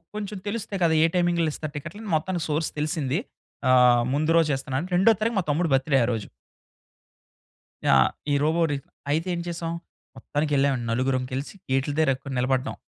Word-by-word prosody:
కొంచెం 210 -1 -4
తెలుస్తయి 205 -2 -3
కదా! 160 -1 +3
ఏ - - +6
టైమింగ్‌లో 175 -2 +2
ఇస్తారు 155 -1 -6
టికెట్లు 170 +8 -8
అని 210 - -5
మొత్తానికి 170 +2 -1
సోర్స్ 155 +1 0
తెలిసింది. 150 -1 -1 0.5
ఆహ్, 125 -1 +6
ముందు 155 +3 +1
రోజు 160 -2 +2
ఇస్తున్నాను 135 +5 -3
రెండో 190 +5 +6
తారీఖు 225 0 0
మా - - 0
తమ్ముడు 160 +1 0
బర్త్‌డే 135 +1 +2
ఆ - - -3
రోజు. 110 -3 -4 1.6
ఆ! - - +6 0.4
ఈ - - +3
'రోబో' 160 +3 +2
రి - - 0 0.4
అయితే 160 +4 0
ఏం 170 - -2
చేసాం? 165 -1 -3 0.4
మొత్తానికకెళ్ళాం 145 -2 0
అండి 120 -2 -4
నలుగురం 130 +2 0
కలిసి 135 +3 -4 0.2
గేట్ల 135 +2 +1
దగ్గర 140 -2 0
నిలబడ్డాం. 130 +1 0
150 Hz, 170 wpm, -25 LUFS, 135-170 Hz, 1.6 s, ఏ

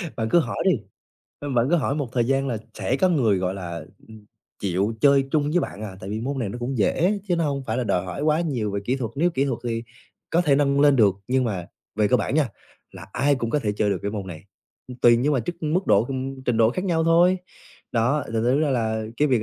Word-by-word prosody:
Bạn 110 -2 -2
cứ 175 - +5
hỏi 160 - -3
đi, 190 - +5 0.7
ơ, 145 - -6
bạn 120 -2 +2
cứ 175 - +4
hỏi 140 -3 0
một 145 -4 -2
thời 120 -2 +1
gian 135 +1 +1
là 120 - -1 0.2
sẽ 100 +6 -1
có 185 - +3
người, 120 - +2
gọi 90 0 -1
là, 85 -4 -6 0.2
ừ, 110 - -12 0.5
chịu 100 +3 0
chơi 140 -1 +4
chung 145 -1 +1
với 180 +3 +2
bạn, 105 - -5
à, 100 -3 -7
tại 95 - -7
vì 110 +1 -3
môn 135 +4 -3
này 115 -6 -2
nó 120 - -6
cũng 120 +1 -3
dễ 180 - +2
chứ 175 - +2
nó 165 - +1
hông 140 -2 -1
phải 110 - -1
là 125 - -1
đòi 90 -4 0
hỏi 90 +10 -5
quá 155 +1 +2
nhiều 130 -11 -1
về 100 0 -2
kỹ 125 +5 0
thuật, 120 -5 -3
nếu 170 +5 +2
kỹ 135 -4 0
thuật 130 -5 -2
thì 115 -1 -2 0.5
có 170 - +3
thể 150 -5 +3
nâng 140 -1 +2
lên 145 -1 +5
được. 105 -6 +4
Nhưng 130 0 +2
mà 95 -7 -3 0.3
về 105 -1 +2
cơ 125 - +4
bản 110 +3 -2
nha, 150 -4 +2 0.4
là - - -11
ai 145 +2 +2
cũng 120 -4 -3
có 150 - +2
thể 105 -7 -1
chơi 105 0 0
được - - 0
cái 100 - -2
môn 100 -2 -5
này, 85 -3 -9 0.4
ừ, 125 - -7
tùy 120 -1 +7
nhưng 135 +6 +1
mà 135 - +2
trức 175 +8 -5
mức 170 +5 0
độ, 100 +2 +4
ừm, 130 +1 -5
trình 125 -3 +1
độ 110 0 +4
khác 185 +9 -3
nhau 165 -4 +1
thôi. 175 +3 +4 0.5
Đó, 125 +6 +1
thành - - -9
thử 125 +5 +2
ra 155 -2 +1
là 110 -3 0
cái 150 +3 +2
việc 125 -5 +2
130 Hz, 270 wpm, -24 LUFS, 110-145 Hz, 0.7 s, tùy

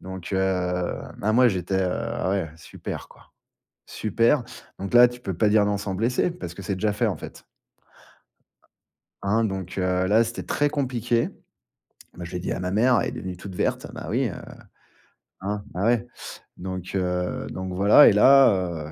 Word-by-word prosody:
Donc, 95 0 -8
heu, 95 - +1 0.8
ben, 110 +2 0
moi 125 +2 +5
j'étais, 95 -2 -2
heu: 90 - 0
«Ah 95 - -2
ouais, 95 -5 -1
super 80 - -8
quoi, - - -20 0.5
super». 115 +5 +1 0.4
Donc 100 +4 -5
là 120 0 +8
tu 120 0 -10
peux 95 - -4
pas 105 - +3
dire 105 -1 +4
non 105 0 0
sans 100 -1 -4
blesser, 125 - 0
parce 130 - -8
que 100 - -10
c'est 95 +1 -3
déjà 105 +3 0
fait, 115 +2 +1
en 95 -6 -2
fait. - - -11 1.8
Hein, 110 +3 +1
donc, 95 -3 -4
heu, 90 0 +1
là 110 +4 +4
c'était 115 +1 -6
très 145 0 +1
compliqué. 125 -5 0 0.9
Moi 85 - -7
je 85 - -10
l'ai 90 - -2
dit 90 - -4
à - - -2
ma 90 0 -3
mère, 120 +4 +3
elle - - -1
est - - -8
devenue 90 -1 -6
toute 95 0 -9
verte, - - -1
bah, - - -8
oui, 125 +5 +1
heu, 100 - -5 1.1
hein, 100 +1 -3
bah, 95 +3 -2
ouais. 120 0 +2 0.5
Donc, 95 0 -6
heu, 90 -1 -1
donc 95 0 -5
voilà 100 +10 +7
et - - +3
là, 95 - +4
heu, - - -11
100 Hz, 185 wpm, -24 LUFS, 90-115 Hz, 1.8 s, là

